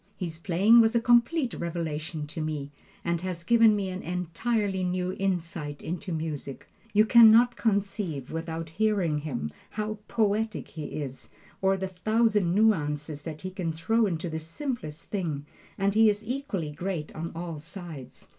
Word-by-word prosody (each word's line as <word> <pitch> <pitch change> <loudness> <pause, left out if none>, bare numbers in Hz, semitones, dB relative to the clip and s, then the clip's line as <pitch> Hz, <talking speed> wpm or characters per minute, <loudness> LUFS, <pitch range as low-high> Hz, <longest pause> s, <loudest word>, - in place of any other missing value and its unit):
His 165 -4 -5
playing 195 +7 +6
was 225 +1 +3
a - - +5
complete 240 +4 +3
revelation 160 -2 -3
to 150 +2 -6
me, 150 -2 -3 0.3
and 170 -1 0
has 180 -2 -4
given 225 +1 +5
me 195 -2 -1
an 185 +1 -5
entirely 190 +3 -1
new 180 0 -1
insight 170 -6 -2
into 175 +2 -4
music. 155 -4 -4 0.2
You 215 +1 +5
can 230 0 +9
not 240 +2 +6
conceive, 195 - -1
without 165 0 -4
hearing 185 -4 +1
him, 125 - -4 0.2
how 215 0 -3
poetic 220 -1 0
he 155 -2 -6 0.2
is, 135 -1 -8 0.3
or 195 0 +3
the 190 0 -3
thousand 210 -1 +2
nuances 150 -8 +1
that 155 0 -7
he 185 - -4
can 180 -3 -2
throw 215 +8 +2
into 170 -2 -2
the 160 -1 -3
simplest 165 - -5
thing, 160 -8 -2 0.3
and 195 0 +1
he 220 +1 +6
is 210 +1 -1
equally 225 - -3
great 165 0 -4
on 165 +2 -5
all 165 -2 -5
sides. 165 -4 -9
180 Hz, 160 wpm, -28 LUFS, 160-215 Hz, 0.3 s, can